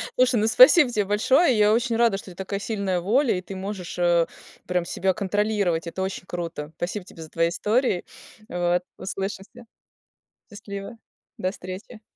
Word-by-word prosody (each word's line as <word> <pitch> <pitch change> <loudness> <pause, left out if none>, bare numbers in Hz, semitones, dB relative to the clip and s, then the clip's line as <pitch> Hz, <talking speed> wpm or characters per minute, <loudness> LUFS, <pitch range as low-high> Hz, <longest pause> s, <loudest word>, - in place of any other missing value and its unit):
Слушай, 255 0 +3
ну 215 - +2
спасибо 345 - +7
тебе 215 -4 0
большое. 250 - +3
Я 210 0 +5
очень 235 0 +1
рада, 230 -3 +3
что 195 - -11
ты - - -14
такая 195 +2 -4
сильная, 200 -4 -2
воля, 235 +7 +2
и - - -4
ты 190 +1 -9
можешь, 190 -2 -6
э, 175 -1 +3 0.4
прям 180 -1 0
себя 190 +2 0
контролировать. 200 -4 0
Это 180 +3 -5
очень 190 -1 -4
круто. 165 -4 -5
Спасибо 180 +2 -4
тебе 165 - -13
за 160 - -12
твои 165 +1 +1
истории. 210 +1 0 0.4
Вот, 175 0 0
услышимся. 195 +4 -6 0.9
Счастливо. 200 +1 -8 0.4
До 185 - -1
встречи. 190 +4 -9
195 Hz, 165 wpm, -24 LUFS, 180-220 Hz, 0.9 s, спасибо